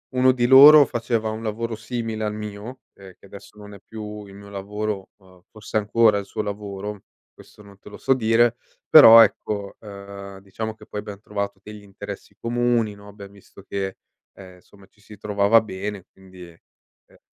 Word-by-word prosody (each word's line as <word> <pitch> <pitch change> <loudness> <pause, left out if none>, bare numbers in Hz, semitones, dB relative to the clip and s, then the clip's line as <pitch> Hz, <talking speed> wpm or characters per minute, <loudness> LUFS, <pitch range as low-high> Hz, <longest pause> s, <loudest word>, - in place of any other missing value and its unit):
uno 130 0 +4
di 120 -1 0
loro 145 +2 +9
faceva 115 -2 -2
un 110 +1 -6
lavoro 115 +1 -4
simile 110 -1 -5
al 105 - -2
mio, 105 +4 -8
ehm, 95 -1 -15
che - - -19
adesso 100 +2 -14
non 105 0 -12
è 100 - -14
più 105 -1 -9
il 100 - -15
mio 100 +1 -13
lavoro, 100 0 -5
uhm, 95 -2 -22
forse 110 0 -5
è - - +4
ancora 105 0 +3
il 100 - -5
suo 105 - -5
lavoro, 100 -1 -7 0.3
questo - - -18
non 100 -1 -17
te 105 - -15
lo - - -11
so 135 - +2
dire. 120 0 +2 0.3
Però 115 -7 +10
ecco, 100 -3 -1
uhm, 100 -1 -11
diciamo 110 +3 -6
che 110 - -18
poi 105 - -6
abbiamo 105 -2 -10
trovato 100 -1 -5
degli 105 -1 -11
interessi 100 -1 -10
comuni, 120 -2 -1
no, 100 0 -16
abbiamo 100 -1 -13
visto 100 0 -17
che, 95 -1 -5 0.4
ehm, 95 -1 -14
insomma 95 +2 -21
ci 105 - -30
si 105 -1 -15
trovava 105 +2 +3
bene 100 -2 -7
quindi, 95 -2 -15
ehm 85 - -27
105 Hz, 185 wpm, -22 LUFS, 100-110 Hz, 0.4 s, Però